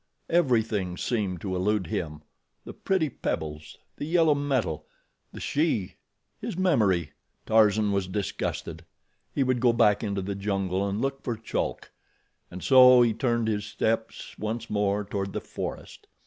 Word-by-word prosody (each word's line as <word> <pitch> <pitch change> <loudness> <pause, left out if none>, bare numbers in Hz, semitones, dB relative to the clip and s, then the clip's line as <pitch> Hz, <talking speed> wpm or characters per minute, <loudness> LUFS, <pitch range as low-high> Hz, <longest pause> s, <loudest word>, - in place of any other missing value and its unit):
Everything 110 - +1
seemed 100 -8 -2
to 95 -2 -3
elude 100 +1 +1
him—the 75 -2 -7
pretty 190 -5 0
pebbles, 75 - -5 0.2
the - - -4
yellow 165 -1 +4
metal, 130 - -1 0.4
the - - -9
she, 145 - -1 0.4
his - - -5
memory. 105 - +2 0.3
Tarzan 110 -1 +4
was 100 -2 0
disgusted. 100 +1 -4 0.5
He 140 - +1
would 130 -1 +1
go 120 0 +4
back 105 -3 +3
into 100 -2 -2
the 100 +1 -3
jungle 95 -1 -1
and 100 +2 -2
look 135 +2 -2
for 120 -2 -2
Chulk, 115 - -3 0.6
and 90 - -8
so 125 -2 +8
he 115 -2 +2
turned 120 0 0
his 105 -2 -1
steps 110 +1 -2
once 110 +2 -4
more 105 0 0
toward 100 -1 -3
the - - -2
forest. - - -7
105 Hz, 145 wpm, -27 LUFS, 95-125 Hz, 0.6 s, so